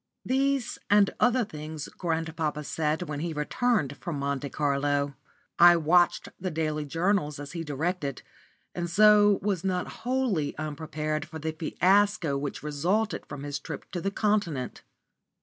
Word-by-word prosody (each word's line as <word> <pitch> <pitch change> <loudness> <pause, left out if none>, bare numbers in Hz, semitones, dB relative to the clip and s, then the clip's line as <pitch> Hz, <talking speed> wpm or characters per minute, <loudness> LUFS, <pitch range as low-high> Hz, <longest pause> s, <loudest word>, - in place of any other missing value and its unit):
These 270 0 0
and 205 -1 +5
other 245 -1 +3
things 155 -4 -7
grandpapa 160 -3 -2
said 155 +2 -1
when 150 -4 -5
he 165 +1 -3
returned 150 - 0
from 170 -4 -4
Monte 140 0 -2
Carlo. 140 0 0 0.5
I 175 0 +9
watched 170 +2 +3
the 185 - -2
daily 155 -2 -2
journals 165 -1 0
as 145 0 -7
he 170 -1 -4
directed, 150 -1 -3 0.5
and 175 -1 -3
so 210 +2 +6
was 195 -5 0
not 185 -2 0 0.2
wholly 240 - 0
unprepared 155 0 -3
for 160 - -8
the 160 +1 -3
fiasco 185 +1 +2
which 140 +1 -4
resulted 180 +9 -1
from 140 - -7
his 145 0 -3
trip - - -8
to 175 - -3
the 195 - 0
Continent. 200 - -1
160 Hz, 145 wpm, -27 LUFS, 150-195 Hz, 0.5 s, I